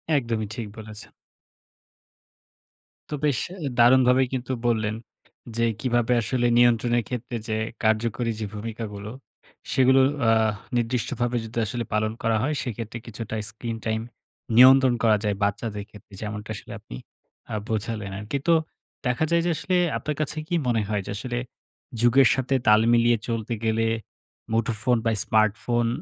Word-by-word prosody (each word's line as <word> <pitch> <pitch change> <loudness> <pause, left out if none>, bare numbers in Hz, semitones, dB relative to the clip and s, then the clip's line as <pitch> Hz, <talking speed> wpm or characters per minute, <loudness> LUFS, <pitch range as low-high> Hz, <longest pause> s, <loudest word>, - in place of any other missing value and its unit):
একদমই 115 -5 -1
ঠিক 115 -3 -5
বলেছেন। 110 -1 -9 2.0
তো 150 - -2
বেশ 140 -5 +2 0.3
এ - - 0
দারুণভাবেই 125 +1 +5
কিন্তু 130 0 -3 0.2
বললেন। 110 -2 +1 0.6
যে 115 - +3 0.2
কিভাবে 120 -1 +1
আসলে 120 +2 0
নিয়ন্ত্রণের 120 0 +3
ক্ষেত্রে 125 0 -5
যে 110 -1 -1 0.3
কার্যকরী 115 +2 +1
যে 110 - -2
ভূমিকাগুলো, 105 -1 -6 0.6
সেগুলো 130 0 +5 0.3
আ - - +6 0.5
নির্দিষ্টভাবে 120 +1 -1
যদি 115 +1 -9
আসলে 120 +3 -3
পালন 110 0 +1
করা 115 -1 +2
হয় 150 +3 0
সেইক্ষেত্রে 115 -2 -5
কিছুটা 115 -1 -6
স্ক্রিন-টাইম 110 -1 -3 0.5
নিয়ন্ত্রণ 130 +1 +8
করা 110 -2 +5
যায় 105 -1 0
বাচ্চাদের 105 0 -2
ক্ষেত্রে 105 -1 -16
যেমনটা 105 0 -5
আসলে - - -10
আপনি - - -10 0.6
আ - - -1
বোঝালেন 110 -2 -3
আরকি। 105 +6 -3
তো 170 - +6 0.5
দেখা 125 +4 +1
যায় 170 0 +4
যে 175 - +2
আসলে 185 - -1 0.2
আপনার 150 - -3
কাছে 150 0 -2
কি 175 - -1
মনে 115 -2 +2
হয়? 105 -1 0
যে - - -5
আসলে 120 +2 -4 0.6
যুগের 120 +2 +6
সাথে 130 +1 0
তাল 105 0 +7
মিলিয়ে 120 0 +4
চলতে 115 -1 -2
গেলে 110 0 +1 0.7
মুঠোফোন 115 +1 +1
বা 115 - +3
স্মার্টফোন 115 +2 +2
115 Hz, 140 wpm, -25 LUFS, 110-125 Hz, 2.0 s, নিয়ন্ত্রণ